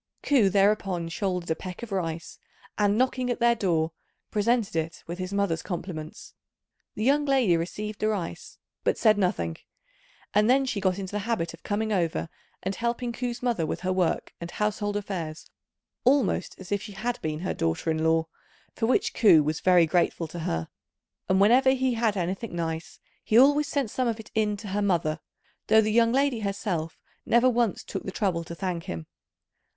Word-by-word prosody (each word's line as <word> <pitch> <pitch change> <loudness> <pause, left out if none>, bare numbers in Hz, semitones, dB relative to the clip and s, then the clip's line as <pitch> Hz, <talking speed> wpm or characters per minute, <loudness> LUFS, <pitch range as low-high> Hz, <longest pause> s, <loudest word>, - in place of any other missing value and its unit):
Ku 250 -9 +4
thereupon 195 -3 +2
shouldered 180 -1 -2
a - - +2
peck 185 +5 -8
of 230 - -7
rice, 165 -4 -3 0.4
and, 205 0 +2
knocking 255 0 +1
at 245 - -1
their 235 0 +5
door, 170 -7 0 0.4
presented 220 -2 +1
it 160 0 -3
with 170 +2 -6
his 185 +1 -4
mother's 200 -5 0
compliments. 170 -4 -6 0.6
The 215 - -3
young 285 +4 +3
lady 265 -10 +3
received 205 +5 -4
the 215 - +1
rice 200 -6 -4 0.3
but - - +1
said 215 -2 +4
nothing; 85 - 0 0.8
and 210 +2 +4
then 270 +2 +4
she 220 -6 -2
got 185 -1 +1
into 190 -2 -5
the 210 - -2
habit 170 -8 -1
of 165 - -13
coming 215 +1 -1
over 170 -3 0 0.3
and 190 - -1
helping 235 +3 -2
Ku's 245 0 -4
mother 235 -9 +1
with 155 - -3
her 185 0 0
work 180 -3 0
and 170 - -5
household 205 +1 -1
affairs, 175 -6 -5 0.6
almost 260 -3 +2
as 190 0 -11
if 200 -1 +1
she 210 -1 -8
had 240 +5 -3
been 155 0 -3
her 185 - -1
daughter 80 - -1
in 160 0 -1
law, 160 0 +3 0.5
for 225 - -1
which 255 - +2
Ku 175 -9 +6
was 155 +1 -1
very 180 -2 +5
grateful 170 0 +1
to 170 - -7
her, 80 - -2 0.6
and 190 0 +3
whenever 255 +6 +5
he 260 -1 +1
had 225 -3 +1
anything 185 +3 -3
nice 165 -1 -4 0.2
he 220 - +2
always 285 +3 +6
sent 280 -8 -1
some 255 -1 0
of 230 -1 -1
it 220 - -11
in 210 -1 +1
to 205 0 -8
her 205 +2 -1
mother, 170 -6 +1 0.5
though 220 - +6
the 215 0 +2
young 230 +1 +4
lady 270 -2 +2
herself 195 -6 -3 0.2
never 235 +2 +4
once 240 -4 +1
took - - -5
the - - -6
trouble 185 -5 -1
to 170 +1 -8
thank 175 -2 -3
him. 80 -2 -5
200 Hz, 190 wpm, -27 LUFS, 170-230 Hz, 0.8 s, Ku